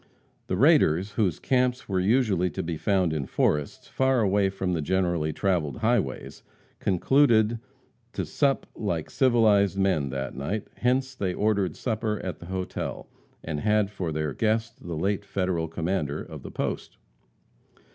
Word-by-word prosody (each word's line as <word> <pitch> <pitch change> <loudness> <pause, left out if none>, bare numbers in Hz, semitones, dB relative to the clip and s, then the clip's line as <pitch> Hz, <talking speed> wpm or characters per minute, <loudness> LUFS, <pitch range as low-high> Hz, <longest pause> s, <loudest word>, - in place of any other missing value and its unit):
The 90 - -1
raiders, 105 - +4
whose 100 -7 0
camps 125 -1 +1
were 95 -2 0
usually 100 -3 +2
to 95 - -4
be 80 0 -3
found 95 -1 +1
in 70 -4 -2
forests, 75 -1 0
far 130 -2 +2
away 100 -1 +2
from 95 -1 -2
the 80 - -1
generally 85 -2 0
traveled 85 -3 0
highways, 110 - -1 0.4
concluded 115 +2 +3 0.5
to - - -2
sup 140 -2 +1
like 85 -7 -3
civilized 110 -6 +3
men 95 -8 +1
that 65 0 -4
night, 75 +11 -4
hence 130 +2 +1
they 95 -7 -2
ordered 100 -3 +1
supper 110 -3 -2
at 90 - -5
the 85 - -10
hotel, 95 0 -4 0.3
and 75 -2 -3
had 105 +2 +2
for 90 -5 -3
their 75 -1 -2
guest 115 +1 -1
the 85 -2 -5
late 100 +4 0
Federal 90 -4 -1
commander 80 -3 -2
of - - -10
the - - -8
post. - - -4
95 Hz, 150 wpm, -26 LUFS, 85-110 Hz, 0.5 s, raiders